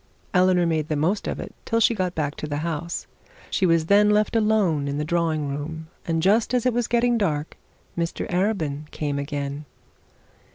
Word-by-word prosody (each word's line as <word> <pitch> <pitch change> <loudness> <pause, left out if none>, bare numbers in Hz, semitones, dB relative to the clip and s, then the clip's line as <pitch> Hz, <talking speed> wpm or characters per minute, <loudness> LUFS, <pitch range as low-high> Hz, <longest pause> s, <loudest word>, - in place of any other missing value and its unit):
Eleanor 180 -1 +4
made 160 -2 0
the 155 - -1
most 175 +8 0
of - - -3
it - - -7
till 230 - 0
she 230 - +4
got 185 -4 -2
back 145 -2 -1
to 150 - -6
the 145 -1 -2
house. 170 +1 -3 0.5
She 190 - +2
was 165 -1 +3
then 205 +3 +5
left 210 +2 +2
alone 210 -10 +2
in 140 0 -2
the 150 - -1
drawing 160 -3 0
room, 160 +3 -5 0.2
and 165 -1 0
just 220 +6 +3
as 245 - +1
it 250 - +3
was 240 -1 0
getting 240 0 +2
dark 155 -6 -1 0.4
Mr 170 0 -2
Arabin 165 -6 -1
came 145 -2 -3
in. 140 0 -4
165 Hz, 190 wpm, -24 LUFS, 150-205 Hz, 0.5 s, then